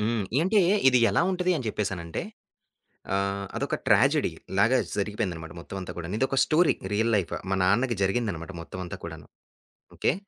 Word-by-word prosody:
హ్మ్. 110 0 0 0.2
ఏంటే 200 +5 +3 0.3
ఇది 125 -1 +5
ఎలా - - +2
ఉంటది 180 0 +1
అని 130 - -5
చెప్పేసనంటే 90 -6 -3 0.9
ఆహ్, 100 0 -1
అదొక - - -1
ట్రాజడి‌లాగా 110 +7 +3 0.2
జరిగిపోయిందనమాట 95 -6 -3
మొత్తమంతా 95 +1 -7
కూడాను. 90 +4 -4
ఇదొక 135 +1 0
స్టోరీ 165 +1 +3 0.2
రియల్ 115 +2 +2
లైఫ్. 95 -5 0 0.2
మా 95 - +1
నాన్నకి 115 +6 +2
జరిగిందనమాట 95 -4 -1
మొత్తమంతా 90 +1 -7
కూడాను. 80 -3 -8 0.7
ఓకే. - - +1
100 Hz, 135 wpm, -27 LUFS, 90-120 Hz, 0.9 s, ఇది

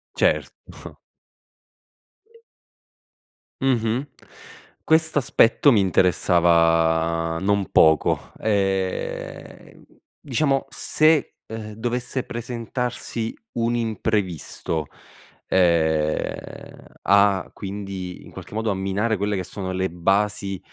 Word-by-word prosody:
Certo. - - -2 2.6
Mh-mh. 125 0 0 0.8
Questo 160 -1 +3
aspetto 135 +1 +4
mi 115 - +4
interessava 85 -3 +2
non 100 0 0
poco. 80 -2 +3
Ehm, 95 -3 -3 0.3
diciamo 135 +1 0
se, 155 -1 +2
ehm, 110 -1 -7
dovesse 120 +3 -3
presentarsi 120 -1 -4 0.3
un 115 +1 +1
imprevisto, 100 -8 -2 0.6
ehm, 80 -4 0 0.2
a 100 -1 +3
quindi 95 -2 -6
in - - -14
qualche - - -10
modo 110 -1 0
a - - -1
minare 100 +4 0
quelle 100 +1 -1
che 95 - -2
sono 95 +1 -5
le 95 +1 -1
basi 95 +2 0
100 Hz, 85 wpm, -23 LUFS, 90-115 Hz, 2.6 s, aspetto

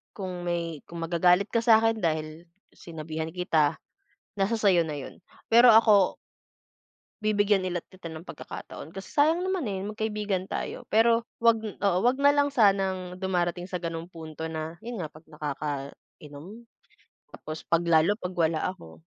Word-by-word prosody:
kung 180 -3 -5
may 170 -3 -2
kung 170 -1 -6
magagalit 180 +4 +3
ka 230 - +2
sa'kin 225 -1 +4
dahil 155 0 -3 0.3
sinabihan 160 -1 -6
kita, 160 -4 +1 0.6
nasa 195 +4 +1
sa'yo 190 -5 +4
na 150 - -4
yun, 135 - -9 0.3
pero 235 +1 +8
ako 210 -4 +5 1.1
Bibigyan 205 -2 +2
ulit 180 -2 -3
kita 180 -3 -10
ng 160 +2 -9
pagkakataon, 155 - -9
kasi 195 +2 -9
sayang 320 +5 +3
naman, 370 - -1
eh, 190 -1 -3
magkaibigan 210 -3 -2
tayo. - - -4
Pero 230 +1 +4 0.2
'wag 230 -1 +4
oo, 200 -3 0
'wag 250 +3 +2
na 285 +1 +5
lang 285 0 +2
sanang 195 -6 +2
dumarating 180 -1 -1
sa 180 - -2
gano'ng 165 0 -5
punto 160 -1 -7
na 160 +1 -5
yun 235 -1 -6
nga, 165 - -3
'pag 155 - -15
nakakainom, 150 +6 -7 0.7
tapos 155 0 -8
'pag 170 0 +2
lalo 165 +5 +4
'pag 180 0 -5
wala 160 -1 +2
ako. 85 - -13
180 Hz, 150 wpm, -27 LUFS, 160-215 Hz, 1.1 s, pero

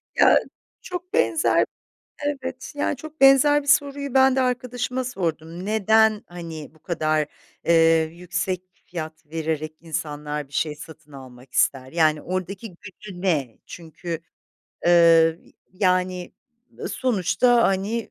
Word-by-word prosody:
Ya - - +6 0.4
çok 360 +2 -7
benzer, 325 - +3 0.6
evet, 270 -3 -4
yani, 290 0 0
çok 310 +2 -11
benzer 280 +2 +6
bir - - -14
soruyu 280 -2 +2
ben 265 0 +5
de 265 - +2
arkadaşıma 250 0 -2
sordum. 170 -6 -4
Neden, 220 +1 +3
hani, 165 -4 -8
bu - - -22
kadar, 155 -3 0 0.4
eee, 165 -1 +5
yüksek 180 +1 -3 0.2
fiyat 160 -2 -7
vererek 155 0 -3
insanlar 150 -2 -4
bir 140 - -23
şey 150 +1 -1
satın 150 -1 -13
almak 130 -2 -13
ister? 130 -1 +1
Yani, 155 -2 +2
oradaki 185 +4 -4
gücü 190 -1 -11
ne? 150 - 0
Çünkü, 165 0 -7 0.7
eee, 165 -1 +6 0.3
yani, 185 -1 0 0.5
ııı, - - -4
sonuçta, 240 +1 +2
hani, 205 +4 0
180 Hz, 125 wpm, -23 LUFS, 160-240 Hz, 0.7 s, Ya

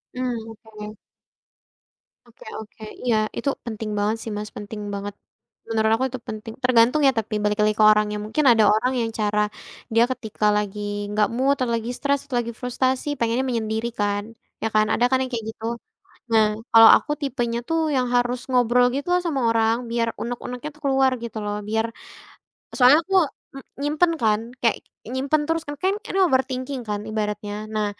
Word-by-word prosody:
Mmm, 240 -3 -3
oke. 215 -1 -9 1.3
Oke 235 - -17
oke 220 0 -12 0.2
iya 235 -3 +3 0.2
itu 280 - 0 0.2
penting 220 -1 -5
banget 210 +2 +1
sih 225 - -5
Mas, 210 0 -5
penting 210 +1 -7
banget, 200 0 -4 0.6
menurut 220 -1 +2
aku 260 +3 0
itu 255 - -5
penting, 215 +1 -6
tergantung 250 +4 +4
ya - - +6
tapi 215 0 -6
balik 210 0 +1
lagi 215 0 +2
ke 215 - +6
orangnya 210 0 +1
mungkin 220 +8 0
ada 225 -2 +5
orang 235 +4 +1
yang 225 - -2
cara, 210 0 +1 0.5
dia 230 +1 +5
ketika 220 -4 -3
lagi 210 0 -3 0.4
gak 210 -1 +3
mood 270 +3 +2
atau 255 -3 -2
lagi 230 +1 -3
stres 280 -1 +1
atau 260 - -4
lagi 235 - -5
frustasi 255 +2 -1
pengennya 235 +3 +1
menyendiri 225 -2 -1
kan, 205 0 0 0.4
ya 225 - +2
kan 215 0 +5
ada 240 - +3
kan 260 - +3
yang 260 - -6
kayak 230 -3 -3
gitu, 220 - -10 0.7
nah 220 -1 +5 0.3
kalau 225 0 +9
aku - - -6
tipenya 240 -4 -1
tuh 325 0 +1 0.2
yang 255 -1 +1
harus 245 0 +1
ngobrol 245 -1 +4
gitu 280 +3 -3
loh 360 - +3
sama 280 -5 -1
orang 225 0 +3 0.2
biar 230 0 +1
unek-uneknya 245 +3 -5
tuh 305 - -21
keluar 270 -1 +3
gitu 230 -1 -6
loh 205 0 -2
biar 220 +1 +1 0.9
soalnya 255 +3 +7
aku 385 - -3 0.4
m 275 - -8 0.2
nyimpen 310 +4 +2
kan 215 -1 +3 0.2
kayak 230 -2 +3 0.4
nyimpen 275 +4 +1
terus 325 +1 0
kan, 290 - -4
kan 380 - +2 0.2
ini 390 - -2
overthinking 260 -1 -1
kan 205 -1 -2
ibaratnya. 210 -1 -3 0.2
Nah 215 -1 +1
230 Hz, 180 wpm, -23 LUFS, 215-260 Hz, 1.3 s, kalau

